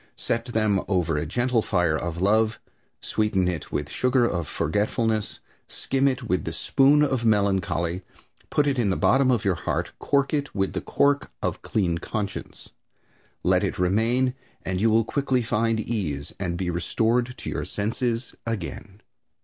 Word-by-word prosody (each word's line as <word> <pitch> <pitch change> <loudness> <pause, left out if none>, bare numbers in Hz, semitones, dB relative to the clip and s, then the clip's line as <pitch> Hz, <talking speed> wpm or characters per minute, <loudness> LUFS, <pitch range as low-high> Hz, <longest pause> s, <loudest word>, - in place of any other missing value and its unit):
Set 115 0 -1
them 110 -5 +1
over 90 -5 +1
a 75 - -1
gentle 120 -1 +1
fire 90 -7 +1
of 85 +1 -3
love, 110 +2 +2 0.4
sweeten 105 -4 0
it 85 -4 -3
with 75 -1 -2
sugar 125 - +2
of 85 -8 -1
forgetfulness, 105 - -1 0.3
skim 135 +1 0
it 130 -1 0
with 95 -6 0
the 80 - -3
spoon 140 - +4
of 130 -5 0
melancholy, 95 -5 +1 0.5
put 150 - +2
it 140 -3 +1
in 110 -4 +2
the 95 - 0
bottom 130 0 +4
of 120 -4 +1
your 95 - +3
heart, 85 - -2
cork 140 0 +1
it 145 -1 -1
with 95 -2 0
the - - -2
cork 140 0 +1
of - - -2
clean 85 -6 0
conscience. 100 0 -5 0.7
Let 90 +1 +3
it 100 - -1
remain 115 +8 +2 0.3
and 95 0 -1
you 115 - +4
will 110 0 +3
quickly 130 -1 0
find 115 0 +1
ease 90 -11 -3
and 90 -3 -2
be 90 -1 -1
restored 115 +8 0
to - - -5
your - - -2
senses 115 +3 -2
again. 100 - -5
110 Hz, 165 wpm, -25 LUFS, 90-120 Hz, 0.7 s, spoon